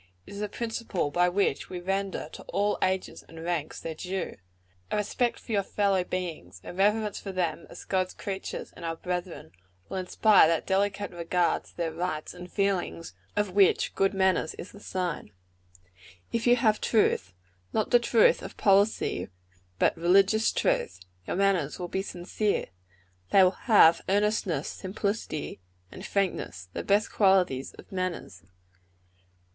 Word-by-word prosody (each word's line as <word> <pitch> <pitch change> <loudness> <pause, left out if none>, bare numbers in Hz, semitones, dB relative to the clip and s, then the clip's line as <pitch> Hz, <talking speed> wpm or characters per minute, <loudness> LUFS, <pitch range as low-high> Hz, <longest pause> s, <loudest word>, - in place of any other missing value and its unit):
It - - -11
is 200 - -7
the 210 0 -2
principle 225 -9 -3
by 175 +3 +3
which 195 +3 0
we 180 - -5
render 195 -2 -2
to - - -10
all 205 +1 0
ranks 190 0 -1
and 165 - -15
ages 165 -2 -3
their 165 - -4
due. 185 +3 -4 0.5
A - - -1
respect 235 +3 0
for - - -10
your 205 -2 +3
fellow 195 -1 +1
beings, 165 - -5
a - - -8
reverence 210 +3 +1
for 195 - -6
them 180 -3 -2
as - - -10
God's 185 -1 -1
creatures 195 -1 -5
and 175 - -11
our 165 0 -2
brethren, 180 - -5 0.4
will - - -4
inspire 190 +1 +5
that 165 -1 0
delicate 200 +1 0
regard 175 0 0
to - - -20
their 170 -2 -1
rights 160 -2 -3
and 180 0 -10
feelings, 195 -4 -1 0.2
of 205 -2 0
which 195 0 +3
good 195 +1 +1
manners 190 -4 +1
is 180 - -9
the 205 - -13
sign. 180 - -4 1.0
"If 230 +1 -1
you 240 - +7
have 220 -3 +2
truth 95 - +1 0.4
not 215 - -1
the 245 - +7
truth 235 -2 +4
of - - -9
policy, 200 +2 +2 0.5
but - - +3
religious 195 +6 +4
truth 90 - 0 0.3
your - - -2
manners 190 -6 +1
will 180 - -4
be 190 - -1
sincere. 195 +3 -2 0.6
They 195 - +6
will 185 - +5 0.2
have 185 -8 +7
earnestness, 205 -2 +1
simplicity 195 - -4 0.3
and - - -10
frankness 95 - -2
the - - -3
best 205 +1 +2
qualities 185 -10 +2
of - - -15
manners. 185 -7 -4
190 Hz, 155 wpm, -28 LUFS, 175-205 Hz, 1.0 s, you